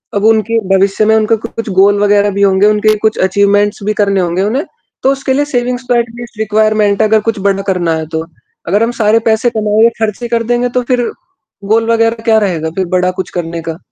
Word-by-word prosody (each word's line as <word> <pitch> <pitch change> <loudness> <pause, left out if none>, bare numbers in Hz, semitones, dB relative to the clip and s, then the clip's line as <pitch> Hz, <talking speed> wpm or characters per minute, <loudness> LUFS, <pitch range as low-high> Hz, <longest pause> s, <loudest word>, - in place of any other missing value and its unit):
अब 200 - 0
उनके 225 +1 +2 0.2
भविष्य 200 +2 +1
में 220 0 +3
उनका 220 +1 +2
कुछ 230 0 -7
गोल 200 +1 +3
वग़ैरह 205 0 +3
भी 200 - -3
होंगे, 195 0 +3
उनके 215 0 +2
कुछ 215 +1 0
अचीवमेंट्स 200 +2 +1
भी 215 +1 -1
करने 200 -2 +1
होंगे 175 +1 -1
उन्हें। 250 +9 -1 0.4
तो 270 - +3
उसके 270 -1 -2
लिए 290 +2 +1
सेविंग्स 250 -2 -2
तो 245 - +3
एटलीस्ट 235 -1 -4
रिक्वायरमेंट 215 -1 +1
अगर 220 0 +3
कुछ 225 -2 -1
बड़ा 195 0 0
करना 175 -3 0
है 160 0 -4
तो। 160 0 -2 0.4
अगर 205 +6 +2
हम 230 - 0
सारे 215 +1 +3
पैसे 220 +2 +2
कमाएँ 215 -1 +1
या 230 - +6
ख़र्चे 220 +2 -2
कर 230 0 -1
देंगे 245 +1 0
तो - - +2
फ़िर? 245 -1 +2 0.6
गोल 225 +2 +1
वग़ैरह 230 0 0
क्या 225 -1 +3
रहेगा 170 -6 -2
फ़िर 190 +2 -2
बड़ा 180 0 +1
कुछ 185 - -3
करने 165 -1 -4
का? 160 - -5
215 Hz, 215 wpm, -13 LUFS, 200-230 Hz, 0.6 s, या